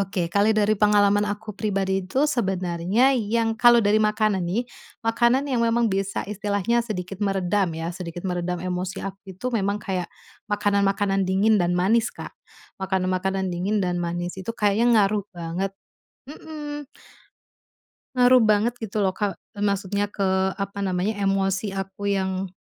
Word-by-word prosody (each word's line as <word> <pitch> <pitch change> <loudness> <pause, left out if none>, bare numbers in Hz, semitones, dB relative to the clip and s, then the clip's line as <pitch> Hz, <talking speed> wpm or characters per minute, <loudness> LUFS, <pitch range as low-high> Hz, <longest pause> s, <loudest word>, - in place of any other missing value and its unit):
Oke, 190 -3 -1
kali 205 +4 +3
dari 215 0 +2
pengalaman 205 -1 +4
aku 210 +1 -4
pribadi 195 -3 0
itu 260 +9 0
sebenarnya 190 - +1
yang 225 0 0
kalau 240 0 +7
dari 205 +1 +3
makanan 215 -1 +2
nih, 195 +8 0 0.4
makanan 235 +3 +2
yang 250 - +1
memang 230 0 +2
bisa 195 +1 -1
istilahnya 205 +2 0
sedikit 195 -4 -5
meredam 195 -3 0
ya 165 +1 -3
sedikit 175 -1 -7
meredam 180 -1 -2
emosi 180 +1 -3
aku 195 0 -6 0.2
itu 190 +8 -6
memang 205 -3 -1
kayak 185 -2 -2 0.4
makanan-makanan 200 -1 +1
dingin 205 +3 +3
dan 175 -1 +1
manis, 205 +6 +3
Kak. - - -8 0.5
Makanan 190 -1 -1
makanan 190 0 -1
dingin 190 +4 -1
dan 180 -1 -1
manis 175 +1 -3
itu 190 +4 -4
kayaknya 230 +2 +3
ngaruh 205 0 -1
banget, 175 +3 -3 0.6
mhm. 295 -1 -7 1.3
Ngaruh 250 0 +6
banget 215 +2 +3
gitu 215 -1 -3
loh, 190 -2 +1
Kak, 205 -3 -2 0.2
maksudnya 200 0 -1
ke, 190 -1 +1
apa 200 0 -4
namanya, 190 +2 0
emosi 195 +1 0
aku 195 +1 -4
yang 190 -1 -1
200 Hz, 145 wpm, -24 LUFS, 190-215 Hz, 1.3 s, kalau